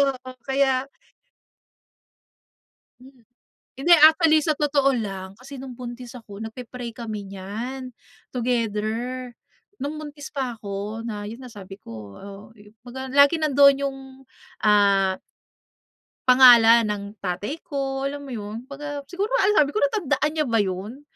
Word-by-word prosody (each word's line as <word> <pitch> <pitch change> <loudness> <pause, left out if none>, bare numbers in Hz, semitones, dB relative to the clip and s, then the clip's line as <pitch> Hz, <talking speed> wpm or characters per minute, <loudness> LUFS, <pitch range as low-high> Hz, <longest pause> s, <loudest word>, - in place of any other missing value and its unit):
oo, 255 0 -10 0.2
kaya 270 -1 +1 2.1
Hmm, 255 -2 -18 0.5
hindi 335 +6 +2
actually, 315 0 +5
sa 310 0 0
totoo 280 -2 +2
lang, 195 -4 -5
kasi 265 +4 -11
no'ng 260 -1 -8
buntis 245 0 -9
ako, 220 -5 -11
nagpe-pray 235 +1 -7
kami 215 -4 -6
niyan, 225 +7 -6 0.4
together, 240 +1 -2 0.5
no'ng 300 +2 -4
buntis 295 -2 -9
pa 260 -4 -3
ako 210 +1 -6
na, 210 -3 -5
'yon 230 +5 -8
na, 250 - -10
sabi 200 -3 -10
ko, 110 - -11
oh, 200 - -11 0.4
kumbaga, 255 +2 -8
lagi 285 +4 +5
nandoon 280 -2 +6
yung, 270 -1 -2 0.6
ah 200 -2 +3 1.1
pangalan 235 -3 +8
ng 205 -1 -3
tatay 200 - -4
ko, 270 -2 -2
alam 285 +1 -4
mo 275 - -10
'yon, 220 -1 -6
kumbaga, 285 +2 -7
siguro 390 +3 -1 0.2
alam 415 +2 +3
sabi 290 -1 +3
ko - - 0
natandaan 300 -1 +1
niya 305 -1 -1
ba 230 -3 +2
'yon? 200 +8 -5
250 Hz, 135 wpm, -23 LUFS, 210-275 Hz, 2.1 s, pangalan